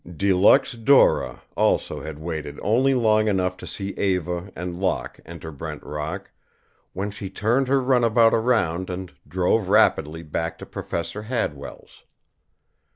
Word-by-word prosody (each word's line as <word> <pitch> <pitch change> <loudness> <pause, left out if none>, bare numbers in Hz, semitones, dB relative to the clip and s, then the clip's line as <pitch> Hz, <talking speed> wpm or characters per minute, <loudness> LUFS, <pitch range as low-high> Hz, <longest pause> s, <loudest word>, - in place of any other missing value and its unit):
De 100 +2 +2
Luxe 105 +9 +5
Dora 125 +3 +3
also - - +1
had 80 -1 -7
waited 80 -2 -5
only 130 +6 +3
long 110 -3 +3
enough 95 -3 +1
to - - -10
see 100 -1 -5
Eva 90 -2 -2
and 90 0 -5
Locke 95 -1 -2
enter 80 -1 -8
Brent 70 - -7
Rock, 75 +6 -5 0.6
when 100 +2 -3
she 100 -1 -7
turned 115 +7 +1
her 135 +1 +3
runabout 120 -3 +3
around 100 -7 +1
and 90 -3 -6
drove 90 +5 +1
rapidly 80 -5 +3
back 80 +1 -3
to - - -9
Professor 85 +5 -5
Hadwell's. 75 - -5
95 Hz, 140 wpm, -23 LUFS, 85-110 Hz, 0.6 s, Luxe